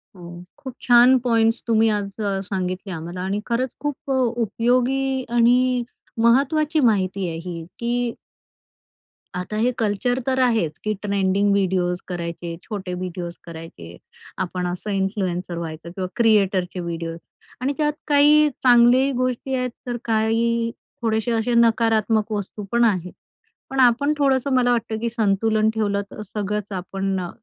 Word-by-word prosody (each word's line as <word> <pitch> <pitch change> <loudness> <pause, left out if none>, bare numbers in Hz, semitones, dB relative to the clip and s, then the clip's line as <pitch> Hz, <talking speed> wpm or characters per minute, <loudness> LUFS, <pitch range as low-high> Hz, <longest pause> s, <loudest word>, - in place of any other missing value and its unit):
हो, 175 -1 -10
खूप 265 -4 -9
छान 245 +1 +6
पॉइंट्स 230 -1 +2
तुम्ही 225 0 +3
आज 205 -2 0
अ, 200 -2 -1
सांगितले 185 0 -4
आम्हाला 170 +3 -6
आणि 195 +2 -2
खरंच 245 +2 -1
खूप 290 -1 -4
अ, - - +2
उपयोगी 250 +2 +1
आणि 245 +1 +3 0.4
महत्त्वाची 300 +6 +3
माहिती 195 -6 +1
आहे 165 -1 -4
ही 170 -2 -6
की 240 0 -1 1.2
आता 180 +4 -4
हे 240 +3 +2
कल्चर 230 +4 0
तर 260 0 +1
आहेच 225 -12 +1
की 215 0 0
ट्रेंडिंग 200 0 +1
व्हिडिओज 185 -2 +1
करायचे, 170 -1 -5
छोटे 195 -5 -5
व्हिडिओज 180 -1 -5
करायचे, 160 - -10 0.4
आपण 180 -1 -2
असं 180 +4 -5
इन्फ्लुएन्सर 190 -3 -2
व्हायचं 165 0 -6
किंवा 185 0 -4
क्रिएटरचे 195 -5 +2
व्हिडिओज 165 -1 -4 0.4
आणि 275 +3 0
त्यात 300 -1 +1
काही 295 +1 +5
चांगली 250 +2 +5
गोष्टी 255 +1 -1
आहेत 250 0 -1 0.2
तर 240 0 -2
काही 230 +1 +1 0.3
थोडेसे 225 0 0
असे 230 +1 0
नकारात्मक 225 -2 +2
वस्तू 205 0 -4
पण 235 0 +3
आहेत. 185 -5 +1 0.6
पण 270 0 -3
आपण 260 +4 +4
थोडंसं 275 -1 +1
मला 245 -1 +3
वाटतं 225 -2 -1
की 235 0 -1
संतुलन 220 0 +1
ठेवलं, 205 -2 0
तर - - -8
सगळंच 210 0 -4
आपण 195 +1 -3
अ, 175 -1 -4
220 Hz, 140 wpm, -22 LUFS, 185-245 Hz, 1.2 s, छान